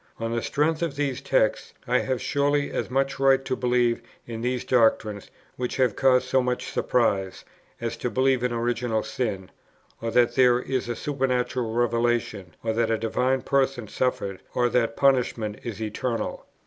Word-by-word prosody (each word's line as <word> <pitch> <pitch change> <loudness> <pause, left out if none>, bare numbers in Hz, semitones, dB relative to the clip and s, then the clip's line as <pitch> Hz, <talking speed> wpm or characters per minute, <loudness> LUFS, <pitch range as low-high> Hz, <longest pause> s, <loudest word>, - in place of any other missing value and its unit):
On 115 0 -2
the 120 - 0
strength 155 +5 0
of 165 -4 -1
these 140 -3 -2
texts, - - 0
I - - +3
have 130 -2 -1
surely 145 +2 0
as - - -3
much 135 +1 0
right 135 0 +4
to - - -1
believe 120 -2 +1 0.2
in 115 -1 -6
these 125 0 -1
doctrines 110 -4 +2 0.3
which 125 -1 -3
have 125 -5 +2
caused 130 -1 +3
so 130 +1 +3
much 125 0 -2
surprise, 95 -6 0 0.3
as - - -3
to - - -2
believe 130 -1 +2
in 125 - +1
original 120 -1 -1
sin, 100 -7 -3 0.5
or 115 - -2
that 120 +1 +3
there 125 -2 +5
is 125 -1 -2
a 120 - -1
supernatural 130 -4 -1
revelation, 115 -6 0
or 110 -1 0
that 115 0 +1
a 115 - +2
Divine 125 +4 0
Person 135 -4 0
suffered, 100 -5 -2
or 120 0 +2
that 115 -1 0
punishment 120 -6 +1
is 115 -4 -6
eternal. 115 +2 -3
125 Hz, 170 wpm, -25 LUFS, 115-130 Hz, 0.5 s, there